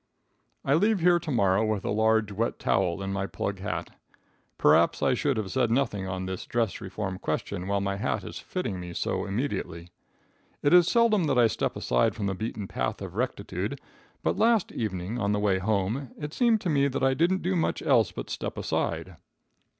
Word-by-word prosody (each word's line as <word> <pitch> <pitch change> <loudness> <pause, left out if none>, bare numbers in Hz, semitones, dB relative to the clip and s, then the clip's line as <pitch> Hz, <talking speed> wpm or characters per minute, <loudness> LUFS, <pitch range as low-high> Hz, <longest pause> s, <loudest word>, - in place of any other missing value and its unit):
I 135 - +3
leave 205 +6 +3
here 175 0 +5
to 170 -1 -7
morrow 100 -5 +3
with 110 -2 -1
a - - 0
large, 110 0 +2
wet 110 +4 -1
towel 90 +2 0
in 95 0 -3
my 100 0 -2
plug 100 -1 -4
hat. 95 - -4 0.7
Perhaps - - +4
I - - +4
should 135 +1 0
have 100 -4 -3
said 125 0 +1
nothing 115 -6 0
on 95 0 -3
this 95 -1 -5
dress 115 -4 -1
reform 95 -1 -4
question 90 +1 -3
while 100 0 0
my 100 0 -1
hat - - -1
is - - -7
fitting 115 - -4
me 90 -1 -7
so - - -2
immediately. 95 -7 -3 0.7
It 145 - +4
is 175 -1 +7
seldom 225 -6 +3
that 140 -4 +1
I 120 - +6
step 115 - -1
aside - - +1
from 105 -2 -3
the 95 - 0
beaten 105 0 -4
path - - -2
of - - -7
rectitude, - - -3 0.4
but - - 0
last 225 -3 +3
evening, 105 +1 -3
on 100 -1 +1
the 105 - +1
way 100 -2 +2
home, 110 +6 -1
it 150 0 -6
seemed 235 -4 +3
to 180 - -2
me 140 -1 +3
that 130 -1 -2
I 135 0 +4
didn't 175 +7 +1
do 185 +2 0
much 165 - 0
else - - +3
but - - -7
step - - -4
aside. - - -2
110 Hz, 200 wpm, -27 LUFS, 95-145 Hz, 0.7 s, is